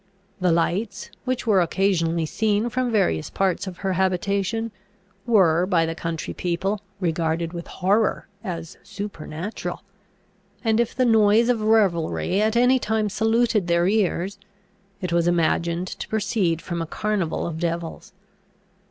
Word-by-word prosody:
The 180 -1 +2
lights 195 +5 -1
which 255 -1 -1
were 205 -5 +4
occasionally 170 -2 +1
seen 215 +6 0
from 250 +1 0
various 85 - +1
parts 190 0 0
of 180 -2 -6
her 190 - +1
habitation, 200 +4 0 0.6
were, 180 -6 +4
by 170 -4 +3
the 165 - -2
country 165 -1 -4
people, 190 +4 -2 0.2
regarded 165 -1 -1
with 170 -1 -6
horror 205 +4 +1 0.2
as 165 -5 -6
supernatural; 195 -2 -6 0.8
and 225 0 +2
if 235 -1 0
the 255 - +2
noise 225 0 +4
of 235 -3 +2
revelry 195 -3 +2
at 220 +1 +1
any 250 +2 +4
time 220 -2 0
saluted 225 -2 +1
their 170 +1 +3
ears, 200 -1 0 0.6
it 180 -2 -2
was 170 0 +2
imagined 170 +1 +1
to - - -6
proceed 195 -6 0
from 170 -2 -3
a 165 - -3
carnival 205 -3 -1
of 160 -2 -4
devils. 170 +3 -3
190 Hz, 140 wpm, -23 LUFS, 170-215 Hz, 0.8 s, were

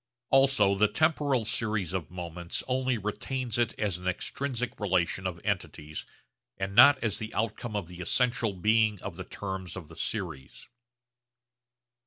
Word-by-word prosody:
Also 135 -7 +5
the 105 +2 +4
temporal 145 -4 +2
series 105 -6 -1
of 85 -5 -3
moments 85 -1 -5
only 130 -1 +1
retains 120 +3 -3
it 120 -2 +1
as 100 -5 -1
an 90 - -6
extrinsic 125 +5 -2
relation 95 -2 +1
of 85 -2 -5
entities 80 -6 -3 0.5
and 95 +1 -3
not 140 +6 +9
as 110 -2 0
the 110 -1 -5
outcome 110 0 -2
of 100 -4 -1
the 90 0 -9
essential 120 +2 +1
being 105 +2 +3
of 95 -3 -5
the 95 - -6
terms 95 -2 -5
of 85 -5 -8
the 80 - -12
series. 65 -5 -5
105 Hz, 150 wpm, -29 LUFS, 90-120 Hz, 0.5 s, not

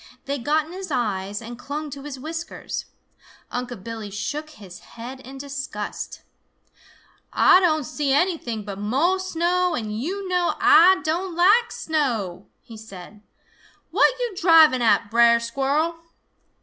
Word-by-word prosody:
They 280 0 -2
got 300 +5 +1
in 320 - -13
his 375 0 -7
eyes 205 -5 -2
and 235 +1 -9
clung 295 +1 -5
to 275 - -8
his 285 -2 -6
whiskers. 325 +4 -6 0.7
Unc' 245 -5 -5
Billy 225 -2 -6
shook 290 +10 -4
his 195 -10 -12
head 245 +3 -10
in 265 +1 -11
disgust. 280 0 -6 1.1
"Ah 365 - +6
don' 315 -5 +2
see 280 +2 -2
anything 275 - 0
but 200 -1 -6
mo' 280 - +1
snow, 360 0 0
and 215 -1 -4
yo' 380 +8 -3
know 360 -2 0
Ah 380 -2 +6
don' 345 +3 -2
like 415 +7 +4
snow!" 240 - -2 0.2
he 230 - -12
said. 205 -1 -12 0.7
"What - - +4
yo' 485 -3 -2
driving 320 -7 +6
at, 205 -2 +2
Brer 235 0 +5
Squirrel?" 275 +7 -1
280 Hz, 140 wpm, -23 LUFS, 230-340 Hz, 1.1 s, Ah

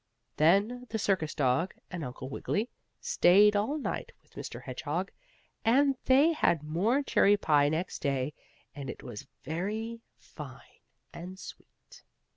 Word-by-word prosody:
Then 205 +10 +3
the 220 - -2
circus 190 -7 0
dog 145 +5 +1 0.2
and 175 -3 -4
Uncle 125 0 -6
Wiggily 210 - -2 0.3
stayed 210 - +5
all 220 +9 +1
night 290 - -4
with - - -29
Mr. - - -7
Hedgehog, - - -3 0.5
and 270 +4 +4
they 280 +6 +5
had 170 - +2
more 200 - +1
cherry 205 -6 +4
pie 145 -6 +3
next 165 +4 -2
day, 140 0 -1 0.4
and 140 -3 -7
it - - -7
was 120 +3 -8 0.2
very 215 - -3 0.2
fine - - -12 0.3
and 180 +2 -8
sweet. - - -13
190 Hz, 135 wpm, -30 LUFS, 150-230 Hz, 0.5 s, stayed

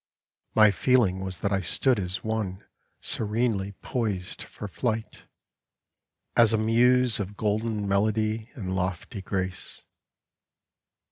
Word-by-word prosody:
My 110 -1 +7
feeling 110 -5 +2
was 95 -2 -3
that 100 - 0
I 100 - +2
stood 120 +6 +2
as 90 -1 0
one 110 -3 -3 0.4
Serenely 105 -2 -1
poised 105 -7 -2
for 105 - -8
flight, 110 +1 -3 1.1
as 115 -2 +6
a - - +3
muse 120 +2 +4
Of 100 0 -5
golden 105 0 -1
melody 110 +3 0
and 95 -7 -4
lofty 95 +3 -3
grace. 95 0 -4
105 Hz, 115 wpm, -27 LUFS, 95-115 Hz, 1.1 s, My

